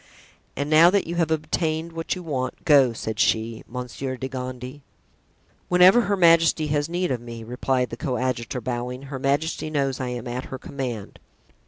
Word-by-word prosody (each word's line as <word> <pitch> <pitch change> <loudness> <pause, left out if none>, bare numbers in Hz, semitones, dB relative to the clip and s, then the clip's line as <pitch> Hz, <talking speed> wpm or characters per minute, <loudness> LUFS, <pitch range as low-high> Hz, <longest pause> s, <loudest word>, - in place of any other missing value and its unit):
"And 145 - -2
now 155 +3 +7
that 200 +1 +1
you 170 - -4
have 165 -2 +1
obtained 160 +1 -1
what 165 +2 -3
you 180 - -7
want, 130 -6 -4
go," 140 -5 +6
said 110 -1 -5
she, 110 0 +1
"Monsieur 125 +1 -5
de 130 - -4
Gondy." 130 +1 -6 0.9
"Whenever 180 +6 +7
her 205 -3 0
majesty 165 -2 +5
has 145 +1 0
need 175 0 -1
of 125 -2 -2
me," 115 -1 -8
replied 125 +1 -1
the 115 - -5
coadjutor, 125 -1 -2
bowing, 125 +2 -4
"her 135 -1 -6
majesty 145 +4 -1
knows 140 -4 -1
I 130 - -2
am 125 0 -5
at 125 +2 -4
her 130 - -6
command." 125 -6 -6
135 Hz, 175 wpm, -24 LUFS, 125-160 Hz, 0.9 s, now